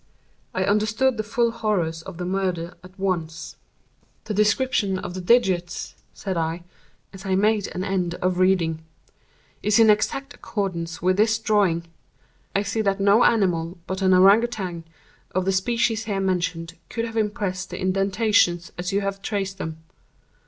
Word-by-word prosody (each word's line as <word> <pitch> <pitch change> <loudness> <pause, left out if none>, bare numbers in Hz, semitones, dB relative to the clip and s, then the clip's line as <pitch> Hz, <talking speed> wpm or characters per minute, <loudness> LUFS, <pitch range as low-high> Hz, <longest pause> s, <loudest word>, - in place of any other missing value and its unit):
I 185 - +1
understood 215 +5 +1
the 215 - -1
full 235 +2 +1
horrors 195 -8 -1
of 180 0 -10
the 180 - -4
murder 180 -2 -2
at 185 +2 -15
once. 170 -4 -3 0.7
"The 215 - -4
description 210 -1 +2
of 180 - -6
the 185 - -5
digits," 180 -4 +1 0.2
said 190 -3 -4
I, 165 +1 -2 0.5
as 190 0 -10
I 190 -2 0
made 210 +1 +2
an 185 - -4
end 180 -3 -1
of 180 0 -1
reading, 170 -4 +2 0.8
"is 210 +1 +3
in 225 -2 +7
exact 275 +7 -1
accordance 170 -6 -4
with 185 +1 +2
this 220 +1 +3
drawing. 205 -6 +1 0.7
I 200 - +2
see 220 +2 -1
that 195 -1 0
no 200 +4 +5
animal 180 -5 +2
but 190 +1 -4
an 185 -1 +4
Ourang 195 +4 +7
Outang, 185 -8 -4 0.5
of 185 0 +1
the 195 - +2
species 225 +3 0
here 200 -3 -2
mentioned, 180 -3 -1 0.2
could 230 0 -2
have 225 -1 -7
impressed 205 -4 -2
the - - -6
indentations 195 -2 +2
as 180 +2 -2
you 200 +1 +1
have 195 0 -3
traced 195 -2 -3
them. 160 -2 -6
195 Hz, 160 wpm, -24 LUFS, 180-215 Hz, 0.8 s, in